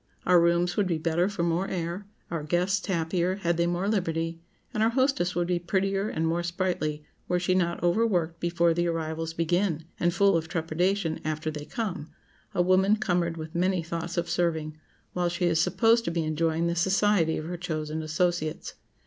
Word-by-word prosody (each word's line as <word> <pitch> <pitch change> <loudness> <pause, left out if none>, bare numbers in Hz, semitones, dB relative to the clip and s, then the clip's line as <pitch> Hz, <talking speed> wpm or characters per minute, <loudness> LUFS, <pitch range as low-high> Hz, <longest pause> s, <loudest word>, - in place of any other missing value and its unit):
Our 180 -1 +6
rooms 170 +1 +2
would 205 -3 +2
be 170 -3 0
better 165 +3 +1
for 200 -4 -2
more 170 +3 0
air, 180 +2 -4 0.2
our 165 -2 -2
guests 180 +5 0
happier 175 0 0
had 170 -4 -1
they 170 0 +2
more 175 +3 -1
liberty, 165 -5 -1 0.3
and 215 - -1
our 220 - +4
hostess 255 -8 +1
would 175 0 0
be 175 -1 +1
prettier 195 +3 0
and 160 - -1
more 165 +1 +1
sprightly 170 -4 -2 0.2
were 180 0 +1
she 180 +1 +1
not 175 -2 0
overworked 175 -3 +1
before 170 -1 +2
the 175 +1 0
arrivals 165 0 -3
begin, 165 -1 0
and 175 - +2
full 195 +1 +3
of 160 -1 0
trepidation 165 +1 0
after 155 0 -2
they 150 -1 -7
come,—a 185 -3 -5
woman 190 +3 +4
cumbered 175 -5 0
with 160 0 -7
many 180 0 +1
thoughts 170 +1 -4
of 170 0 0
serving, 160 -3 -1 0.4
while 175 -1 0
she 175 +1 -1
is 165 -2 +3
supposed 230 +6 +3
to - - 0
be 170 -1 -1
enjoying 160 +1 0
the 170 0 0
society 190 -2 +2
of 155 - -5
her 175 +2 -4
chosen 160 -3 -3
associates. 155 0 -1
170 Hz, 185 wpm, -27 LUFS, 165-185 Hz, 0.4 s, Our